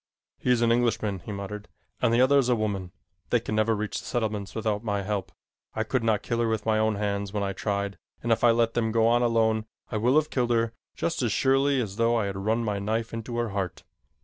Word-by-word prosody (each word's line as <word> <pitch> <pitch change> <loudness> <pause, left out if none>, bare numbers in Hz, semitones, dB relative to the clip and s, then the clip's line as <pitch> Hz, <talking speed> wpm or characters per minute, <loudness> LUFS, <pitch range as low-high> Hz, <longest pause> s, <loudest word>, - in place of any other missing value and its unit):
"He - - -2
is 120 -1 +4
an 115 - +4
Englishman," 115 -4 +1
he 105 - -8
muttered, 105 +1 -6 0.3
"and - - +3
the 120 +1 +4
other 140 +2 +5
is 125 -2 +1
a 125 - +4
woman. 100 -5 -2 0.4
They - - +3
can - - -5
never 110 +1 +2
reach 105 0 -3
the - - -11
settlements 110 -5 -2
without 110 -1 -1
my 100 -3 -1
help. 100 -1 -3 0.4
I 110 - 0
could 120 +1 -1
not 110 -3 +1
kill 115 -1 -1
her 120 - +2
with 110 -2 -1
my 110 -1 +2
own 110 -1 +2
hands 100 -1 -2
when 105 -1 -1
I 100 0 -1
tried, 100 0 -2 0.2
and 120 - 0
if 115 - +2
I 120 - +7
let 115 0 +3
them 110 -2 0
go 115 0 +3
on 120 +1 +4
alone, 110 -2 +2 0.2
I 110 - -1
will 120 +5 +2
have 155 0 +3
killed 125 -2 0
her 115 -1 +1 0.2
just - - -1
as - - +1
surely 135 +1 +3
as 105 -5 -3
though 115 0 +3
I 115 -3 +1
had 100 -1 -3
run 110 +4 0
my 105 -2 -1
knife 110 +3 -2
into 115 +1 -4
her 120 -1 0
heart. 95 -3 -3
110 Hz, 250 wpm, -27 LUFS, 105-115 Hz, 0.4 s, I